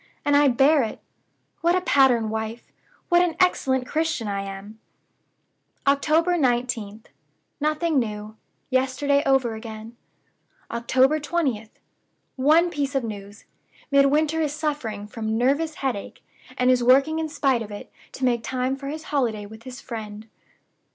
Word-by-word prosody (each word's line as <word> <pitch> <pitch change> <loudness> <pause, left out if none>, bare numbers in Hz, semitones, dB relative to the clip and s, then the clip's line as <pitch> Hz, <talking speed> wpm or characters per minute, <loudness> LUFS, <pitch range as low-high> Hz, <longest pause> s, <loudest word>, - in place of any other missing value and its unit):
And 290 0 +3
I 290 0 +5
bear 275 +4 +4
it! 225 - -4 0.6
What 345 +2 +2
a 370 - +1
pattern 250 -9 +3
wife, 220 +1 -5 0.4
what 350 0 +5
an 350 -2 0
excellent 260 -8 +2
Christian 310 -5 -1
I 200 -1 -2
am!" 195 +2 -8 1.1
"October 310 +5 +3
19th. 240 -5 -1 0.5
Nothing 305 0 +1
new. 215 -2 -5 0.4
Yesterday 265 +2 +1
over 265 -4 +2
again." 220 +1 -9 0.8
"October 260 +5 +2
20th. 275 -9 -2 0.6
One 315 +6 +4
piece 280 -2 -2
of 270 - +1
news. 205 -1 -8 0.5
Midwinter 295 +3 +3
is 300 -2 -1
suffering 290 -10 -3
from 220 +1 -3
nervous 285 +6 +1
headache; 255 -9 -4 0.3
and 250 0 +3
is 250 -1 +2
working 275 +6 +4
in 320 -1 -2
spite 275 -5 +1
of 215 - -6
it, 205 -1 -9 0.2
to 260 - -2
make 240 -2 +1
time 255 +2 -2
for 275 0 -8
his 310 +2 -5
holiday 225 -7 0
with 220 +2 -12
his 255 -1 -8
friend." 215 -2 -7
260 Hz, 140 wpm, -24 LUFS, 220-295 Hz, 1.1 s, I